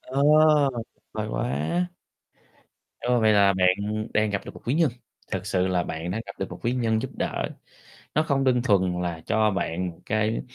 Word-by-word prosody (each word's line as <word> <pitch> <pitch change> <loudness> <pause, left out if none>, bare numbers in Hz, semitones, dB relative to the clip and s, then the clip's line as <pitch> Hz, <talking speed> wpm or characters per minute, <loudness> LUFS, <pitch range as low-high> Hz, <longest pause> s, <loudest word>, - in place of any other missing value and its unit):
Ờ 135 +2 -2 0.9
vời 110 0 -3
quá. 170 +8 -1 1.1
Ơ, 125 0 +1
vậy 110 -1 +4
là 100 -1 +5
bạn 100 +4 +1
đang 105 0 +2
gặp 100 -1 -3
được - - -8
một - - -12
quý 120 - +1
nhân, 160 -3 +3 0.4
thực 95 -1 -3
sự 95 -2 +1
là 90 -1 +1
bạn 85 +2 -4
đang 110 +4 -2
gặp 100 - -7
được 95 - -3
một 90 - -8
quý 120 - +1
nhân 115 -3 +1
giúp - - -5
đỡ. - - -2 0.7
Nó 155 - +4
không 140 -3 +1
đơn 125 -2 +3
thuần 95 -6 +2
là 85 -2 -3
cho 110 -1 +2
bạn 90 -2 -2
một 85 - -13
cái 110 +1 0
105 Hz, 195 wpm, -25 LUFS, 95-120 Hz, 1.1 s, là